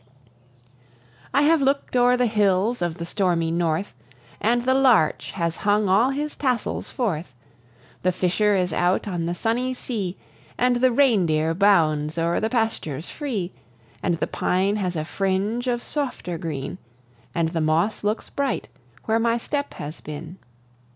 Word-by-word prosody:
I 280 +2 +3
have 315 0 +4
looked 275 -1 0
o'er 245 0 +4
the 250 - +3
hills 210 +1 +2
of 175 -1 -1
the 170 - -5
stormy 170 -3 0
North, 170 +2 -1 0.5
And 240 +2 +2
the 260 +1 +3
larch 255 - +3
has 170 -2 -2
hung 205 0 +2
all 205 +7 +4
his 295 +2 -3
tassels 250 -5 -1
forth; 170 - -3 0.7
The 185 - +2
fisher 195 +4 +1
is 180 -1 0
out 180 +4 +1
on 175 -4 -2
the 175 - -2
sunny 245 +6 -1
sea, 205 -8 -4 0.4
And 245 0 +3
the 255 +1 +3
reindeer 180 - +3
bounds 160 -5 +3
o'er 170 +1 +1
the 220 - 0
pastures 220 - -2
free, 220 - -3 0.5
And 175 -3 +1
the - - 0
pine 195 +3 0
has 185 -4 -2
a 155 -1 -2
fringe 195 +7 -1
of 240 -1 0
softer 250 - -3
green, 155 +1 -5 0.6
And 165 -1 +1
the 165 -1 -2
moss 160 +9 +1
looks 210 +2 -1
bright, 280 -1 -2 0.4
where 225 +1 +2
my 230 0 +2
step 285 +4 -3
has 150 +2 -7
been. 155 +4 -8
200 Hz, 155 wpm, -24 LUFS, 170-245 Hz, 0.7 s, have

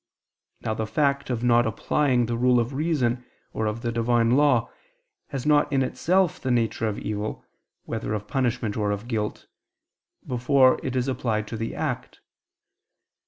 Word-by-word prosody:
Now 110 - -1
the 110 0 -3
fact 140 +2 0
of 120 -2 -2
not 120 -1 +4
applying 125 +3 +1
the 120 +1 -2
rule 125 +1 +3
of 120 +3 -1
reason 130 -5 0 0.3
or 110 - -1
of 110 +3 -3
the 120 - -1
Divine 115 0 +2
law, 130 -3 +3 0.6
has 135 -3 -5
not 150 -1 +3
in 135 -2 +2
itself 175 +7 +1
the 130 - -2
nature 115 -2 +1
of 105 - -2
evil, 105 0 -4 0.4
whether 110 -1 -3
of 105 -1 -5
punishment 120 -5 -1
or 105 -2 0
of 105 +3 -3
guilt, 110 -3 -3 0.8
before 130 +1 +3
it 130 - -3
is 125 0 0
applied 115 -5 -1
to - - -4
the 115 +1 -4
act. - - -4
120 Hz, 165 wpm, -25 LUFS, 110-130 Hz, 0.8 s, not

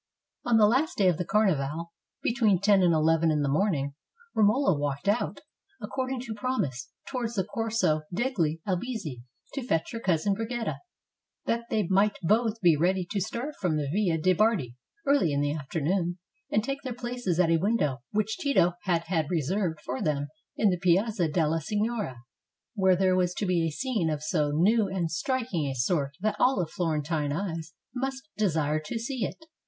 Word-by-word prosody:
] - - -44
On 235 -2 +5
the 215 - +7
last 260 +9 +2
day 195 - +4
of 170 -1 0
the 180 - -1
Carnival, 170 -6 +1 0.3
between 225 -6 +3
ten 200 0 +4
and 175 -2 +4
eleven 160 +1 +3
in 150 -2 +1
the - - 0
morning, 145 -2 +1 0.4
Romola 215 - +3
walked 145 +2 -3
out, 210 +4 0 0.4
according 255 +5 -3
to 235 -3 -5
prom 255 +2 0
ise, 130 -2 -7 0.2
towards 240 -3 -3
the 190 - +1
Corso 220 -6 0
degli 175 - 0
Albizzi, 185 - -3 0.3
to 275 - -3
fetch 165 -10 -1
her 230 - -4
cousin 190 -1 +1
Brigida, 225 +2 -3 0.7
that 235 0 -1
they 215 -3 +1
might 200 +3 +3
both 225 +4 +2
be 170 -4 +5
ready 180 +4 +1
to 200 -2 0
start 235 +9 -3
from 170 -5 +1
the 145 -2 -1
Via 190 -5 +2
de' 185 +4 +3
Bardi 185 - +1 0.3
early 280 - +3
in 140 - +1
the 145 0 +1
afternoon, 170 +4 -1 0.3
and 210 - +1
take 275 +3 -3
their 255 -4 -5
places 240 -8 -2
at 170 -2 +4
a 165 - +5
window 160 - 0
which 215 +1 -1
Tito 225 -12 +3
had 170 -3 +1
had 165 -3 -1
reserved 170 +1 -1
for 130 +1 -3
them 145 -2 -1 0.3
in 210 -3 +4
the 180 - -1
Piazza 185 +1 +2
della 160 0 +1
Signoria, 210 - -2 0.5
where 190 -4 +4
there 185 0 +3
was 180 -1 +1
to 210 - -1
be 175 -3 +1
a - - -2
scene 215 - -1
of 150 -1 -2
so 150 -2 +1
new 200 +9 +3
and 185 -4 -2
striking 225 - -1
a 135 - -3
sort 140 +2 0
that 215 +1 0
all 250 -9 +3
Florentine 155 -2 -1
eyes 165 -1 -4 0.2
must 265 +1 -3
desire 155 -7 +1
to 155 +9 -5
see 235 +1 -3
it. 320 - -8
185 Hz, 185 wpm, -28 LUFS, 160-225 Hz, 0.7 s, the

